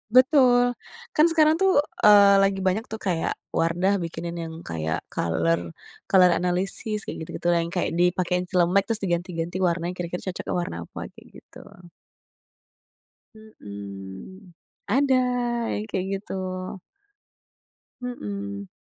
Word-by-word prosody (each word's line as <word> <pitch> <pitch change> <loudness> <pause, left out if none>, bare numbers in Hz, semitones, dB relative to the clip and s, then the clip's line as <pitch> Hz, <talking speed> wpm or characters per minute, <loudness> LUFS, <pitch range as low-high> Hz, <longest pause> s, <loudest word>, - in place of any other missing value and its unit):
Betul, 250 -2 +5 0.4
kan 305 - +5
sekarang 310 -1 +4
tuh, 385 0 +5 0.3
eee, 200 -1 +7
lagi 195 0 +2
banyak 215 +5 0
tuh 220 - -5
kayak 170 -3 -1 0.2
Wardah 175 +4 +1
bikinin 170 +1 -5
yang 160 -1 -6 0.2
kayak 80 -1 -3
color, 85 0 0 0.4
color 180 -2 +6
analisis 185 +5 -1
kayak - - -6
gitu-gitu 160 - -5
yang 170 0 0
kayak 180 - -1
dipakein 180 +1 +1
celemek 180 +2 +3
terus 225 -2 +1
diganti-ganti 175 -1 -2
warnanya 175 0 0
kira-kira 175 0 -5
cocoknya - - -5
warna 175 - -4
apa, - - -10
kayak - - -16
gitu. - - -15 1.7
Mhm, 100 - -10 0.4
ada 270 +4 +3 0.5
yang 210 - -3
kayak 190 -3 -3
gitu. 195 - -9 1.7
Mhm. 100 - -6
180 Hz, 120 wpm, -25 LUFS, 165-210 Hz, 1.7 s, eee